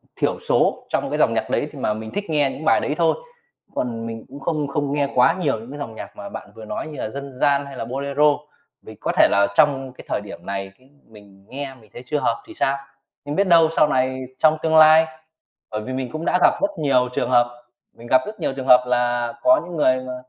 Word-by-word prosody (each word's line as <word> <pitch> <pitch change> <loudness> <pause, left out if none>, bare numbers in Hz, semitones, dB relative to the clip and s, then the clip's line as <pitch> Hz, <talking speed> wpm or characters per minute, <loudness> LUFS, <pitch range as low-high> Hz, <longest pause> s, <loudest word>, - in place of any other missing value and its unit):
thiểu - - -1
số - - +1
trong - - -1
cái - - -2
dòng - - +3
nhạc - - -2
đấy - - 0
thì - - -10
mà 105 - 0
mình 110 +1 -7
thích 205 -3 -4
nghe 145 -3 +2
những 155 - -8
bài - - +4
đấy 150 - -2
thôi. 165 -1 +3 0.6
Còn 115 -2 -3
mình 115 -1 -7
cũng 140 - -11
không 150 0 -1
không 140 0 -2
nghe 145 -1 0
quá 125 +6 +5
nhiều 140 -10 0
những 115 +3 -11
cái 145 - -8
dòng 115 -6 -6
nhạc - - -9
mà - - -7
bạn - - -9
vừa 110 - -10
nói 110 - -5
như 150 - -9
là - - -3
dân 140 +2 -7
gian 140 +2 +2
hay 140 - -10
là 115 - -4
bolero, 140 +4 +2 0.5
vì - - -12
có - - -2
thể - - +7
là 100 0 +4
trong 135 -4 +3
cái - - -13
thời - - -1
điểm 105 - -11
này, 95 -1 -4
cái, 130 +1 -24 0.2
mình 100 -2 -18
nghe 135 0 -6
mình 110 -4 -20
thấy 120 - -9
chưa 150 +3 -1
hợp 410 - -1
thì 335 - -11
sao? 140 - 0 0.5
Nhưng 145 +1 -4
biết 200 0 +2
đâu 165 -2 +6
sau 150 - +6
này 130 0 0
trong 155 0 +4
tương 160 0 +3
lai, 155 +1 +8 0.7
bởi 105 0 -3
vì 130 +4 -6
mình 130 -2 -4
cũng 155 +1 -4
đã 180 - +2
gặp - - +6
rất 300 +1 +1
nhiều 130 -4 +2
trường 125 - -1
hợp, 120 0 +2 0.3
mình 115 - -12
gặp 130 +1 +4
rất 215 0 -8
nhiều - - -1
trường 135 -1 -6
hợp 125 -1 +7
là 120 -1 0
có 320 0 +5
những 175 -2 -7
người 130 -3 +3
mà 125 - -4
135 Hz, 255 wpm, -22 LUFS, 120-150 Hz, 0.7 s, lai